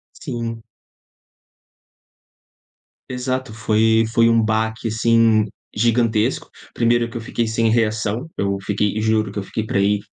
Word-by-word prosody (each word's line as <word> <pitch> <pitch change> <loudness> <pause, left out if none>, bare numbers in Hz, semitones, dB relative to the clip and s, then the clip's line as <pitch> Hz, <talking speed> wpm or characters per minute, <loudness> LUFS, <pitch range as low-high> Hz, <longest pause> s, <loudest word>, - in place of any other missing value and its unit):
Sim. 115 -1 -5 2.5
Exato, 130 -1 -3
foi 110 0 +2
foi 115 -1 +4
um 115 0 +4
baque 110 +1 -1
assim 115 0 +3 0.3
gigantesco. 115 -1 +1 0.3
Primeiro 120 0 +2
que 120 - -9
eu - - -3
fiquei 115 +1 -2
sem 115 +1 +1
reação, 110 +4 0
eu 100 0 0
fiquei 105 +1 -1
e - - 0
juro 110 -2 +1
que 105 - -5
eu - - -2
fiquei 105 +2 -4
pra 100 - -1
aí 100 +1 +2
110 Hz, 135 wpm, -20 LUFS, 110-115 Hz, 2.5 s, foi